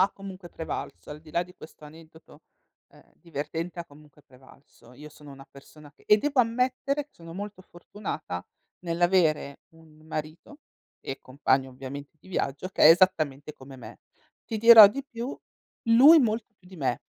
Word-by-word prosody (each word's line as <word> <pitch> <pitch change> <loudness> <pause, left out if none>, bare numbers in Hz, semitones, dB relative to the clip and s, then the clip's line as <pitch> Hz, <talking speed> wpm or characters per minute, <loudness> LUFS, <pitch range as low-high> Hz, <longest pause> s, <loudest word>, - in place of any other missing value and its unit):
ha 195 +2 +4
comunque 190 -2 -11
prevalso. 160 -2 -7
Al 150 +1 -9
di 155 - -16
là 170 +3 -1
di 180 0 -18
questo 155 - -15
aneddoto, 160 +1 -17 0.5
ehm, - - -23
divertente, 165 +2 -6
ha 170 - -5
comunque 150 -1 -20
prevalso. 130 -2 -21
Io 150 +3 -12
sono 150 -1 -15
una 135 0 -13
persona 145 +1 -17
che - - -28
e 210 - +5
devo 285 +3 +1
ammettere 255 +4 -1
che 295 - -40
sono 165 -1 -13
molto 200 +1 -8
fortunata 175 - -7 0.4
nell'avere 170 -4 0
un 160 -1 -20
marito 155 - -7 0.4
e 135 - -7
compagno 130 0 -1
ovviamente 135 +3 -10
di - - -23
viaggio, 175 -2 -3
che - - -2
è - - +9
esattamente 155 -5 +2
come 135 -1 -14
me. 125 - -12 0.5
Ti 220 - -5
dirò 225 -2 +10
di 275 +6 -6
più, 240 +3 -6 0.5
lui 260 +8 +7
molto 225 -4 0
più 180 - -23
di 190 - -13
me. 130 -6 -2
165 Hz, 170 wpm, -26 LUFS, 145-200 Hz, 0.5 s, dirò